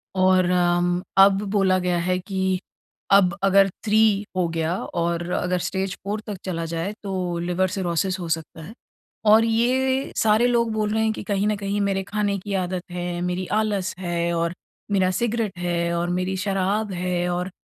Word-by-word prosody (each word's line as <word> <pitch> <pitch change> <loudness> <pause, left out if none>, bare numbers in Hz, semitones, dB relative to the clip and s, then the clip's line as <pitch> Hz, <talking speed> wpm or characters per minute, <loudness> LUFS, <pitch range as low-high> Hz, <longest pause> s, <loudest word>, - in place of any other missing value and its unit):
और 185 -1 +4
अम, 175 0 +2 0.2
अब 195 0 +6
बोला 195 -3 +3
गया 180 -1 0
है 180 +2 0
कि 190 -1 -1 0.5
अब 195 -1 +5
अगर 195 0 +5 0.2
3 215 -1 +3
हो 180 -2 +1
गया 165 +1 -1
और 170 0 -2
अगर 180 0 0
स्टेज 190 0 -2
4 205 +2 -2
तक 205 -3 -4
चला 165 -3 -3
जाए 170 +5 -3
तो 185 -3 -2
लिवर 180 +2 0
सिरोसिस 185 +1 -1
हो 175 - -5
सकता 160 0 -3
है। 190 +8 -10 0.6
और 220 +1 +7
ये 260 +4 +1
सारे 220 +2 +4
लोग 235 -2 +1
बोल 215 -1 -1
रहे 220 0 +1
हैं 220 - +2
कि - - -7
कहीं 200 0 0
न 210 - +1
कहीं 200 0 -2
मेरे 195 -1 0
खाने 205 0 -1
की 200 +2 -6
आदत 180 -1 -2
है, 175 0 -3
मेरी 180 +1 -2 0.2
आलस 200 -4 -1
है 170 -1 -1
और 170 0 0 0.4
मेरा 190 -2 +2
सिगरेट 225 -1 -1
है 170 -1 -1
और 175 +1 -1
मेरी 185 +1 -1
शराब 195 +2 -1
है 180 0 -1
और 180 +1 -2
185 Hz, 180 wpm, -23 LUFS, 175-205 Hz, 0.6 s, और